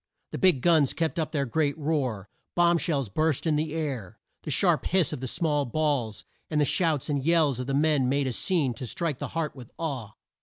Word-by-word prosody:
The - - -5
big 180 -10 +4
guns 160 -6 +4
kept 165 +1 -1
up 160 - -2
their 140 -3 0
great 145 +4 0
roar. 135 -10 -2 0.3
Bomb 175 -1 +4
shells 140 -7 -1
burst 155 - 0
in 160 -2 +2
the 155 +1 -1
air. 135 - -4 0.2
The - - -7
sharp - - +2
hiss 180 -5 +2
of 150 - -4
the 130 - -3
small 150 +1 0
balls, 130 -5 -1 0.2
and 155 - 0
the 145 - +4
shouts 155 -2 +1
and 145 -3 -1
yells 155 -5 +3
of 125 - -4
the 135 - 0
men 145 -3 +2
made 140 +1 +1
a 130 - -1
scene 150 -4 +1
to 120 +2 -6
strike 160 0 -2
the - - -3
heart 155 -3 -2
with 125 -4 -11
awe. 135 -10 -4
150 Hz, 220 wpm, -27 LUFS, 130-160 Hz, 0.3 s, big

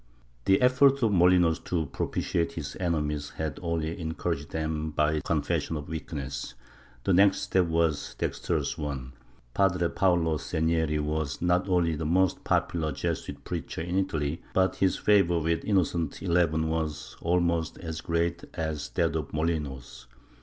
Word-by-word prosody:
^ - - -32
The 95 0 +5
effort 130 +1 +5
of 110 - +3
Molinos 90 -3 +4
to 85 -3 0
propitiate 85 +3 -1
his 80 -4 -5
enemies 75 -5 -1
had 80 -3 -3
only 85 -1 -2
encour 80 +1 -2
aged 70 +1 -10
them 80 -1 -2
by 75 0 +1
its 75 - -3
confession 80 - 0
of 75 - -7
weakness. 75 -4 -5 0.5
Their 95 - +2
next 95 +2 +5
step 90 -2 +2
was 80 -3 0
a - - -20
dextrous - - -1
one. 70 -3 -4 0.4
Padre 90 -3 +2
Paolo 85 -4 +2
Segneri 80 0 0
was 75 -1 -2
not 90 +2 +1
only 85 -3 +2
the 75 +1 -3
most 95 +2 +2
popular 80 -3 0
Jesuit 70 -1 -4
preacher - - -4
in 85 +2 -3
Italy, 80 -5 -1
but 95 0 +2
his 95 -1 +2
favor 100 -5 +4
with 80 +1 0
Innocent 85 -6 +1
XI - - -8
was 80 -2 0
almost 85 -1 +1
as 80 -3 -5
great 85 0 -1
as 80 -2 -3
that - - +1
of - - -3
Molinos. 70 -6 -3
80 Hz, 155 wpm, -28 LUFS, 75-90 Hz, 0.5 s, The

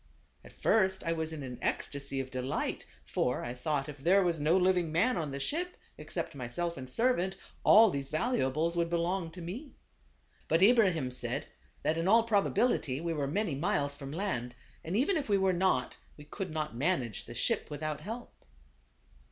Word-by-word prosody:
At - - -13
first 190 -3 +2
I 165 - 0
was 160 -1 -3
in 155 -3 -6
an 125 -2 -7
ecstasy 140 -1 -2
of 130 -1 -4
de 130 - -3
light; 130 - -2 0.2
for 125 - -1
I 120 - -4
thought 135 +2 -2
if 145 -2 -8
there 185 +7 +4
was 170 -3 0
no 155 +5 +3
living 180 -3 +2
man 185 +11 +2
on 160 -4 -2
the 140 0 -5
ship 345 - -2 0.2
except - - -5
myself 145 +7 -3
and 130 -3 -8
servant, 190 - +1 0.3
all 220 -1 +8
these 140 -2 -4
valuables 160 - 0
would 170 -1 +1
belong 170 +1 0
to 175 +1 -9
me. 245 - -7 0.7
But 165 +4 +3
Ibrahim 190 - +4
said, 125 - -3 0.4
that 160 +1 +1
in 165 - 0
all 225 +3 +6
probability 205 - +1
we 165 +1 -2
were 145 -3 -1
many 185 +3 0
miles 145 -2 0
from 135 -1 -8
land, 145 -9 -3 0.3
and 175 +5 -1
even 315 - +2
if 285 -7 -3
we 200 - +4
were 190 -1 +2
not, 175 -8 +1 0.2
we 150 - -11
could 190 +4 -5
not 155 -5 -3
manage 130 - -1
the - - -9
ship - - 0
without 150 0 -4
help. 230 +7 -7
165 Hz, 185 wpm, -31 LUFS, 140-190 Hz, 0.7 s, all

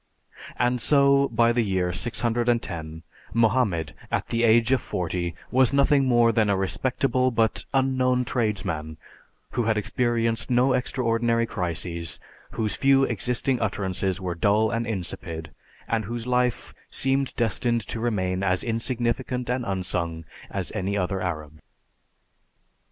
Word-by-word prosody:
And 125 +1 +1
so, 140 +1 +4
by 115 0 +3
the 120 0 +2
year 95 -4 0
610, 115 -8 -1 0.3
Mohammed, 105 - +2 0.2
at - - -1
the 115 - 0
age 115 +1 +4
of 130 - +3
forty, 85 -1 -3 0.2
was 130 0 +4
nothing 140 0 +4
more 120 -2 +4
than 110 -2 +2
a 100 - +2
respectable 130 +6 0
but 115 -2 0
unknown 130 -2 +2
tradesman 95 -10 -2 0.5
who 120 -2 -1
had 110 -1 +1
experienced 115 +2 0
no 125 +2 +3
extraordinary 115 -2 +1
crises, 85 -4 -3 0.3
whose 110 -2 -1
few 135 0 +4
existing 125 0 0
utterances 95 -2 -1
were 90 -2 -3
dull 105 +6 +2
and 115 0 -1
insipid, 85 -5 -5 0.4
and 110 -2 -1
whose 120 +2 -5
life 125 -1 0 0.2
seemed 135 0 0
destined 115 +1 0
to 110 +2 -5
remain 95 -5 -1
as 90 -2 +1
insignificant 120 +1 -1
and 125 0 -1
unsung 90 -4 -2 0.2
as - - -4
any 100 +2 -2
other 95 0 -1
Arab's. 80 -4 -4
115 Hz, 130 wpm, -25 LUFS, 95-125 Hz, 0.5 s, so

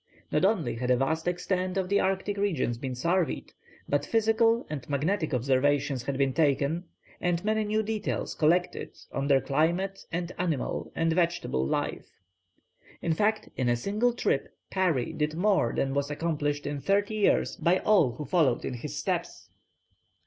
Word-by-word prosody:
Not - - +1
only 190 - +1
had 125 +1 -2
a 125 - +4
vast 160 +6 -1
extent 180 +1 -1
of 190 -1 0
the 200 +1 +2
Arctic 195 +2 0
regions 155 -12 0
been 130 -1 -4
surveyed; 170 +6 -1 0.3
but 145 - +1
physical 225 +1 +2
and 150 -3 -6
magnetic 155 +4 0
observations 135 +1 +1
had 135 +2 -3
been 135 -1 +1
taken, 150 +3 +1 0.3
and 175 +1 0
many 215 0 +2
new 215 +1 +1
details 215 -1 -2
collected 175 +3 +1
on 140 0 -2
their 135 -2 +4
climate 175 +7 0
and 175 +1 -2
animal 165 -7 -2
and 165 0 +1
vegetable 170 - 0
life. - - -2 0.9
In 165 - +2
fact 215 +5 0
in 125 -2 0
a 120 - +3
single 210 - 0
trip - - 0 0.2
Parry 175 -10 +1
did 150 0 -1
more 185 - +2
than 135 0 -1
was 140 0 0
accomplished 145 -2 -1
in 145 -1 -3
thirty 200 +7 +1
years 210 -2 +2
by 175 +2 +2
all 185 - +3
who 150 +5 -6
followed 145 -5 +2
in - - -3
his 120 - -6
steps. - - -3
165 Hz, 165 wpm, -28 LUFS, 140-195 Hz, 0.9 s, a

